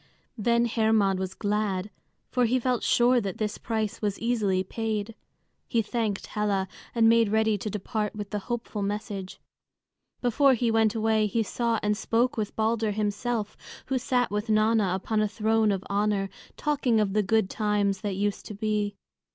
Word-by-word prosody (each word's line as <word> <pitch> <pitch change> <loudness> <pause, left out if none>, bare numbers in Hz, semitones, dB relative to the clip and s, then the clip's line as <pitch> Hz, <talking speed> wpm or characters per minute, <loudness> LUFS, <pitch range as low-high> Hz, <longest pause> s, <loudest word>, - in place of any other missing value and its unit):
Then 235 +1 +2
Hermod 220 -4 +2
was 190 0 -4
glad, 205 -2 -1 0.4
for 250 -1 +2
he 245 +3 +2
felt 250 -1 0
sure 245 +1 +4
that 195 -3 -4
this 210 -1 -2
price 220 -1 -2
was 205 -2 -1
easily 210 -6 +1
paid. 220 +1 -3 0.5
He 230 -1 +1
thanked 215 -2 -2
Hela, 200 -2 -1 0.3
and 225 -1 +5
made 230 -1 +5
ready 220 0 +2
to 215 - -3
depart 210 +1 -3
with 205 -1 -6
the 210 - -1
hopeful 235 -3 -3
message. 200 -2 -4 0.8
Before 260 +3 +4
he 235 -1 +1
went 225 0 +3
away 220 -1 +2
he 225 +3 0
saw 230 +1 -1
and 210 0 +2
spoke 230 +3 +1
with 215 -2 -3
Balder 220 0 +1
himself, 210 +1 -2 0.3
who 265 -1 0
sat 245 -2 0
with 210 +2 -2
Nanna 215 -3 +3
upon 215 +3 -1
a 215 - +2
throne 220 0 +2
of 190 -1 -2
honor, 200 -1 0 0.3
talking 275 -6 +1
of 205 -2 +1
the 210 - +3
good 220 0 +2
times 205 -2 0
that 205 -3 -2
used 205 +1 -2
to 210 - -7
be. 210 -1 -1
215 Hz, 170 wpm, -27 LUFS, 205-230 Hz, 0.8 s, and